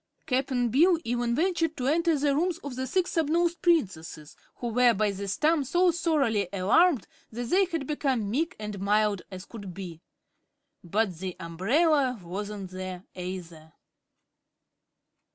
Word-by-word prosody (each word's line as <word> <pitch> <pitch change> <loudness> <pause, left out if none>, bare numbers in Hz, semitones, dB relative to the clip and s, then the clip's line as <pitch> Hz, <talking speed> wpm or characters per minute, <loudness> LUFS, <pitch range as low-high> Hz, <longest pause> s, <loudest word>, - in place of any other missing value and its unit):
Cap'n 255 -2 0
Bill 335 - +4
even 240 0 0
ventured 330 0 0
to 250 - -3
enter 330 +3 +2
the 285 0 +1
rooms 340 +2 0
of 280 -3 -6
the 260 +1 -3
Six 365 +6 0
Snubnosed 335 +1 +1
Princesses, 185 - 0 0.2
who 240 - -4
were 245 +1 +4
by 210 +1 +1
this 200 0 -4
time 310 -1 +3
so 350 +6 +3
thoroughly 275 - +1
alarmed 240 - +3 0.3
that 235 +1 -5
they 390 +2 +5
had 330 -6 -3
become 265 -7 -1
meek 330 +9 -1
and 210 -2 -6
mild 205 0 +2
as 185 -1 -8
could 200 -6 -9
be. 175 -4 -8 0.8
But 185 -1 -1
the 185 -1 -4
umbrella 250 - +1
wasn't 195 +2 -6
there, 185 -1 -6
either. 175 -4 -7
240 Hz, 145 wpm, -27 LUFS, 190-315 Hz, 0.8 s, they